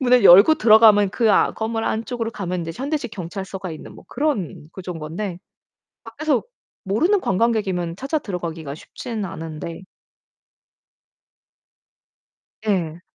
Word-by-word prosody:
문을 250 -3 +4
열고 200 - +9
들어가면 215 -5 +6
그 225 +2 +2
아 - - +3
건물 225 0 -3
안쪽으로 230 +1 -2
가면 180 -5 -4
이제 165 - -5
현대식 275 - -3
경찰서가 190 0 -6
있는 155 - -9
뭐 - - -14
그런 240 - -2
구조인 180 -3 -7
건데. 170 +4 -5 0.7
밖에서 270 +4 -1 0.4
모르는 330 - +2
관광객이면 190 -5 0
찾아 275 +8 -2
들어 200 -10 -5
가기가 160 -4 -6
쉽지는 215 +7 -6
않은데 165 -1 -7 2.8
예. 175 -5 -1
200 Hz, 285 characters per minute, -22 LUFS, 175-230 Hz, 2.8 s, 열고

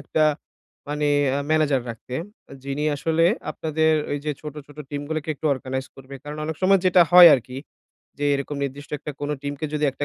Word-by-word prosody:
একটা 155 +1 +1 0.6
মানে 150 0 -1 0.4
ম্যানেজার 150 -4 +2
রাখতে। 115 +2 -9 0.5
যিনি 140 +2 -3
আসলে 160 +3 +1 0.3
আপনাদের 160 0 0 0.2
ওই 145 - -1
যে 150 - -1
ছোট, 150 -2 -8
ছোট, 145 - -17
টিম 145 -1 -4
গুলোকে 155 -1 -4
একটু 150 - -4
অর্গানাইজ 130 0 -5
করবে। 135 +1 -11
কারণ 150 +1 -7
অনেক 160 -1 -4
সময় 195 0 +4
যেটা 180 -1 +6
হয় 175 -1 +11
আরকি 125 0 -5 0.6
যে, 145 - -2
এরকম 140 +1 -4
নির্দিষ্ট 140 +2 -7
একটা 150 - -6
কোন 145 0 -3
টিমকে 145 +2 -4
যদি 150 - 0
একটা 145 - -4
145 Hz, 180 wpm, -23 LUFS, 140-155 Hz, 0.6 s, হয়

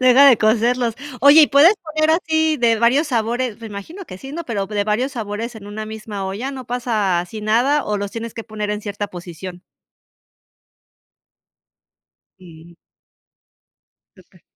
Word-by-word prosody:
Deja 255 +2 +6
de 245 -5 +5
cocerlos. 235 +2 +1 0.3
Oye, 285 +3 +8
¿y - - +6
puedes 295 +8 +6 0.2
poner 310 0 +2
así, 315 -2 +1
de 235 -3 +2
varios 265 +7 +3
sabores? 235 -1 -1
Me 225 - -7
imagino 220 - -8
que 185 - -10
sí, 270 +5 -10
¿no? 335 +1 -5
Pero 205 -6 -3
p 210 - -9
de 205 0 +1
varios 245 +6 -1
sabores, 225 0 -5
en 205 -2 -11
una 215 +1 -6
misma 215 -2 -6
olla, 210 +8 -4
¿no 260 -3 -8
pasa, 220 -7 0
así 180 +5 -7
nada? 245 +8 +2
¿O 210 0 -1
los 200 0 -4
tienes 230 -1 -6
que 225 - -7
poner 215 -2 -4
en 210 0 -3
cierta 205 0 -4
posición? 175 0 -9 2.8
Mm. 170 -1 -15 1.5
Okey. - - -23
225 Hz, 160 wpm, -20 LUFS, 205-260 Hz, 2.8 s, Oye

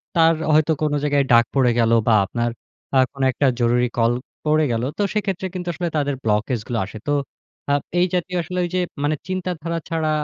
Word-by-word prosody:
তার 165 -1 +5 0.2
হয়তো 155 +1 +4
কোন 150 - +1
জায়গায় 145 -1 +2
ডাক 115 0 +6
পড়ে 130 -3 +4
গেল 115 -1 +3 0.2
বা 115 - +5
আপনার 120 +4 -1 0.5
আ - - +6
কোন 135 - -7
একটা 140 - 0
জরুরি 120 +1 +2
কল 115 0 +3 0.3
পড়ে 155 0 +3
গেল। 115 0 -1
তো - - -1
সেক্ষেত্রে 195 -3 -1
কিন্তু 180 -1 -5
আসলে 170 +2 -3
তাদের 145 -1 0
ব্লকেজ 110 +3 0
গুলো 120 - -2
আসে। 105 +3 -9
তো - - +1 0.6
আব 145 - +2 0.2
এই 180 - +5
জাতীয় 180 0 -1
আসলে 180 +2 -4
ঐ - - -2
যে - - +2 0.2
মানে 150 +1 +1
চিন্তাধারা 175 -3 -3
ছাড়া 160 -1 0
150 Hz, 200 wpm, -21 LUFS, 120-170 Hz, 0.6 s, ডাক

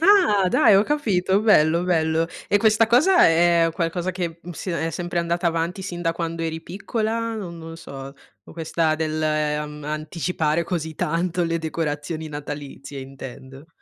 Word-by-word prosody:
Ah! 330 - +5
dai, 200 +2 +5
ho 195 - +6
capito 205 -9 +1
bello, 170 -6 +4
bello. 160 -2 +1 0.2
E 205 - +4
questa 220 +1 +4
cosa 340 +10 +5
è 165 0 +4
qualcosa 175 +1 -1
che, 170 -2 -4
mhmm, 175 - -8
si 180 +3 -5
ne 165 -1 -1
è - - -3
sempre 175 0 -3
andata 170 +1 -1
avanti 170 +3 -1
sin 175 -2 -5
da 165 -1 +1
quando 165 0 -4
eri 160 0 -3
piccola, 225 +4 -2
no 200 -5 -5
non 165 -1 -9
so, 135 -4 -9 0.3
o - - -14
questa 160 -1 0
dell' 155 0 -2
ehm, 150 -1 -1
anticipare 155 +1 -1
così 160 -2 -3
tanto 175 +3 0
le 165 0 0
decorazioni 160 0 -3
natalizie 145 -1 -7
intendo. 135 +1 -10
165 Hz, 165 wpm, -23 LUFS, 155-185 Hz, 0.3 s, ho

